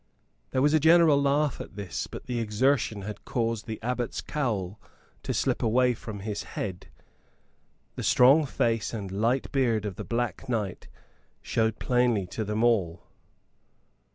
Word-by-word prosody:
There 130 - +1
was 150 +1 +4
a 155 - +5
general 160 -2 +5
laugh 140 +1 +1
at - - -10
this; 100 -3 -4
but - - -9
the 125 -2 -2
exertion 110 -1 +1
had 105 0 -7
caused 115 -2 -2
the 110 -1 -5
abbot's 125 -1 -2
cowl 110 -9 -3 0.4
to - - -3
slip - - 0
away 125 +2 +3
from 105 -3 -8
his 105 0 -4 0.2
head. 95 -3 -4 1.1
The - - -5
strong 140 +5 +5
face 115 -3 0
and 100 -4 -5
light 115 +7 0
beard 115 -6 +1
of 100 -3 -5
the - - -5
Black 120 +1 -3
Knight 105 -6 -3 0.6
showed 110 -1 0
plainly 125 -5 +1
to 110 - -2
them 105 +2 -1
all. 100 -8 +1
115 Hz, 155 wpm, -27 LUFS, 105-130 Hz, 1.1 s, a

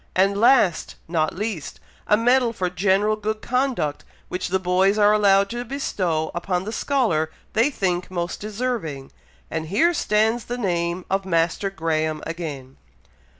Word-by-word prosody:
and 195 +2 +2
last, 230 -8 +3
not 160 -2 0
least, 205 -6 -4 0.3
a 210 - +4
medal 245 +1 +3
for 185 -5 -2
general 195 +4 +2
good 215 0 -3
conduct, 245 - -1 0.3
which 180 - -3
the 190 - +1
boys 190 +2 +2
are 210 0 +5
allowed 200 -2 +4
to 240 +4 -4
bestow 185 - -2
upon 180 +1 -2
the 215 - -5
scholar 220 - +1 0.2
they 230 +6 +3
think 180 -9 -1
most 175 -1 -3
deserving, 210 - -4 0.4
and 160 0 -3
here 325 - +3
stands 220 -3 +1
the 245 - -4
name 175 -4 -1
of 195 0 +1
Master 170 +2 0
Graham 155 -4 -2
again!!" 145 -6 -6
195 Hz, 150 wpm, -23 LUFS, 170-220 Hz, 0.4 s, are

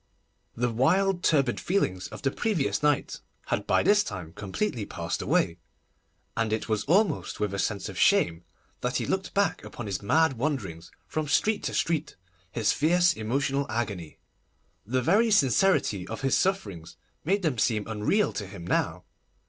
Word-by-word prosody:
The 120 0 0
wild, 180 +10 +2
turbid 140 -6 +2
feelings 100 - -1
of - - -10
the 135 - +1
previous 200 - 0
night 150 -1 +1 0.3
had - - -2
by - - +3
this 205 0 +4
time 90 -6 -7
completely 110 - -3
passed 85 -3 -4
away, 85 +1 +1 0.8
and 115 -2 0
it 110 - -1
was 110 -2 -1
almost 175 0 +1
with 105 -2 -1
a 100 - -3
sense 100 0 -1
of - - -7
shame 85 0 +3 0.4
that - - -2
he - - 0
looked - - -2
back - - +1
upon - - -8
his 100 -3 -3
mad 140 +4 +2
wanderings 105 - -3 0.2
from 155 -1 -3
street 210 +9 +2
to - - -2
street, 160 -2 -1 0.4
his 110 -3 +1
fierce 175 +3 +3
emotional 135 +5 -1
agony. 105 -9 -4 0.7
The 130 +2 0
very 210 - +4
sincerity 135 - +3
of 115 - -6
his 135 0 +2
sufferings 100 - -2 0.3
made 195 +5 +1
them 145 -9 0
seem 110 -2 +1
unreal 110 - +1
to 100 - -4
him 95 -3 -9
now. - - 0
125 Hz, 165 wpm, -27 LUFS, 100-165 Hz, 0.8 s, this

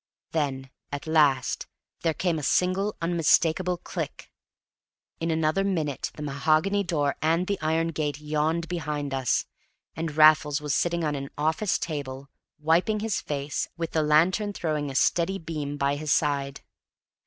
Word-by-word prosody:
Then 135 -4 -2 0.2
at 145 0 -5
last 150 -5 +2 0.3
there 165 -2 0
came 175 -4 0
a 145 - +1
single 190 +3 0
unmistakable 170 +1 +2
click. - - -6 0.9
In 165 - -1
another 160 +3 +1
minute 160 -8 -1
the 150 - -6
mahogany 155 +8 +1
door 150 -6 0
and 165 +4 +2
the 200 +1 -2
iron 160 +1 +1
gate 150 -2 -2
yawned 155 +2 -1
behind 150 -5 -3
us; 130 -3 +1 0.5
and 160 -2 -4
Raffles 155 -1 +6
was 150 -2 -2
sitting 170 +2 +1
on 150 -1 0
an 140 -1 -4
office 160 +6 +1
table, 140 -3 -5 0.3
wiping 175 +8 +2
his 220 -2 -1
face, 145 -1 -3
with 165 -1 -3
the 160 - +1
lantern 175 +7 +3
throwing 150 -5 -2
a 135 - -7
steady 175 +7 +2
beam 150 -4 -5
by 140 0 +1
his 150 0 -3
side. 140 -2 0
155 Hz, 150 wpm, -26 LUFS, 145-170 Hz, 0.9 s, Raffles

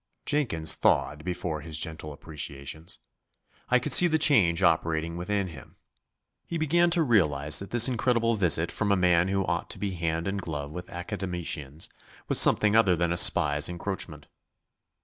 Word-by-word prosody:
Jenkins 80 - 0
thawed 75 +1 0
before 90 -4 -5
his 80 0 -6
gentle 80 -1 -4
appreciations. 75 +2 -7 0.7
I 125 - +4
could 125 - +2
see 180 - +8
the 160 -2 +1
change 100 - +2
operating 80 -1 0
within 95 +2 -3
him. 75 -5 -14 0.7
He 170 - -4
began 170 +3 +1
to 170 -1 +1
realise 75 - +3
that 100 - -9
this 120 0 +4
incredible 115 -2 0
visit 85 -5 +2
from 105 -2 -2
a - - +3
man 90 -1 +2
who 95 0 -1
ought - - -3
to - - -6
be 100 -1 -4
hand 85 -1 -3
and 100 0 -3
glove 75 -4 -6
with 90 +3 -9
Academicians 85 -6 -5 0.4
was - - +5
something 105 0 +5
other 100 -6 +3
than 85 0 -1
a - - -2
spy's 75 -2 +3
encroachment. 85 -4 -6
90 Hz, 165 wpm, -26 LUFS, 80-105 Hz, 0.7 s, see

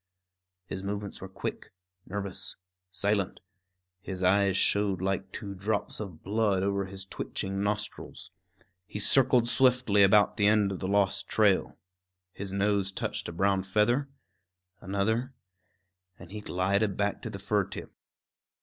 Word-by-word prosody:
His 95 - -5
movements 100 +1 -5
were 95 - -7
quick, 95 - -6 0.4
nervous, 100 0 -4 0.4
silent; 100 0 0 0.6
his 95 -1 -5
eyes 100 +1 +4
showed 100 -3 +3
like 95 0 -2
two 100 -2 -6
drops 100 +2 -2
of 95 -7 -7
blood 100 -2 +1
over 100 0 0
his 95 0 -8
twitching 95 0 -4
nostrils. 105 -2 -4 0.6
He 105 - -5
circled 125 +1 +4
swiftly 125 -5 +3
about 100 +2 +5
the 105 -2 +4
end 105 -2 +4
of 95 - -4
the 95 - -3
lost 100 0 +1
trail. 105 -4 +2 0.6
His 100 -1 -6
nose 100 0 +1
touched 95 - -3
a - - -5
brown 95 +3 +2
feather, 110 +8 +1 0.7
another, 110 +7 -1 0.8
and 90 0 -13
he 105 0 -6
glided 100 +1 0
back 100 0 0
to - - -5
the 105 - -6
fir 100 0 0
tip. - - -8
100 Hz, 140 wpm, -29 LUFS, 95-105 Hz, 0.8 s, about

